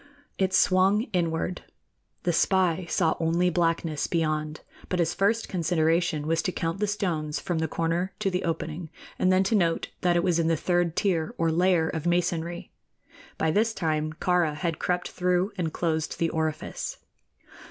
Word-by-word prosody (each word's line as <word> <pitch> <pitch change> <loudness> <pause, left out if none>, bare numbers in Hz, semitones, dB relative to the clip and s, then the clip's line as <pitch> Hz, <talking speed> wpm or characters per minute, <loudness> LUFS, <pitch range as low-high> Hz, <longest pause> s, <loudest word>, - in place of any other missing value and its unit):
It 190 -1 +2
swung 190 +3 +4
inward. 170 0 -1 0.6
The 175 - +1
spy 185 -1 +2
saw 160 0 +2
only 170 +2 +2
blackness 165 -3 0
beyond; 155 -2 -1 0.3
but 180 - 0
his 170 -1 +1
first 225 +3 +1
consideration 165 -2 +1
was 165 +1 +1
to 185 - -1
count 165 +1 -3
the 210 - +1
stones 165 -7 -2
from 175 -3 -2
the 160 - 0
corner 170 +4 -1
to 200 -2 -1
the 180 0 -1
opening, 165 0 -3 0.3
and 185 - +3
then 185 +1 +4
to 195 - 0
note 170 -6 +1
that 175 -1 +2
it 170 - +2
was 175 -3 +2
in 165 - +2
the 165 -1 +2
third 175 -1 0
tier 170 -6 0
or 165 -1 +1
layer 175 -1 +3
of 160 0 -3
masonry. 175 0 -1 0.7
By 160 - +1
this 220 +5 +1
time 155 -2 -1
Kāra 175 -2 +1
had 165 +1 -2
crept 180 0 -1
through 180 +2 +1
and 170 -4 -2
closed 160 -2 -1
the 165 - +1
orifice. 160 - -3
170 Hz, 170 wpm, -26 LUFS, 160-180 Hz, 0.7 s, swung